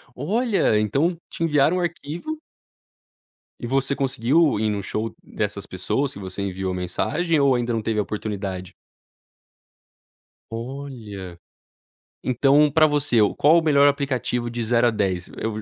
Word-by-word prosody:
Olha, 200 - +1
então 140 - +1
te - - -6
enviaram 150 +1 +3
um - - 0
arquivo 175 - -4 1.2
E 120 - -4
você 135 +2 +1
conseguiu 135 +3 +2
ir 110 - +1
num 105 -1 -2
show 110 +2 -3
dessas 105 -1 -4
pessoas 130 +9 -2
que - - -9
você 95 0 -6
enviou 95 -1 -3
mensagem 150 - 0
ou 140 -2 +4
ainda 120 0 -1
não 115 - -1
teve 110 0 -1
a - - +3
oportunidade? 100 -3 -5 1.8
Olha. 115 -7 -7 0.9
Então 140 +4 +4
pra 155 0 +5
você, 145 -4 +1 0.2
qual 160 +4 +6
o - - -2
melhor 145 -2 +5
aplicativo 130 -4 -1
de 120 0 -3
0 120 +1 +3
a - - +2
10? 95 -4 -1
Eu 110 -1 -3
125 Hz, 140 wpm, -23 LUFS, 105-145 Hz, 1.8 s, qual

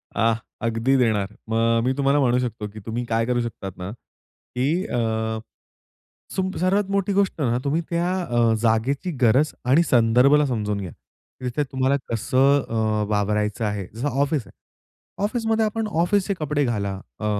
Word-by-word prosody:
आह! 115 0 +3 0.3
अगदी 115 +4 +1
देणार. 110 -6 +2 0.2
मग 115 +1 +2
मी 130 +2 +1
तुम्हाला 140 +1 +3
म्हणू 125 -2 +3
शकतो, 115 -4 -3
की 110 - -8
तुम्ही 115 +2 -3
काय 115 0 +1
करू 120 0 0
शकतात 100 -5 -6
ना, 90 +1 -5
की 135 - -4
अ, 110 -2 -1 1.0
सुम 190 0 0
सर्वात 190 +3 +1
मोठी 200 0 +1
गोष्ट 195 -4 +1
आहे 130 - +2
ना, 120 - +1
तुम्ही 150 +4 0
त्या 170 +1 0
अ, 120 -6 +2
जागेची 120 +10 +1
गरज 130 +6 +4
आणि 135 +7 +5
संदर्भाला 130 +2 +4
समजून 105 -6 -1
घ्या. 90 -3 -6 0.5
तिथे 125 +4 -1
तुम्हाला 130 +1 +1 0.2
कसं 130 +5 +3
अ, 110 -2 0
वावरायचं 105 +2 0
आहे. 105 -3 -3
जसं 120 +6 -2
ऑफिस 140 -6 0
आहे. - - -17 0.7
ऑफिसमध्ये 225 0 +1
आपण 220 +1 -2
ऑफिसचे 200 +3 +1
कपडे 150 -1 0
घाला, 100 -5 -1 0.3
अ, 105 - -4
125 Hz, 160 wpm, -23 LUFS, 110-150 Hz, 1.0 s, आणि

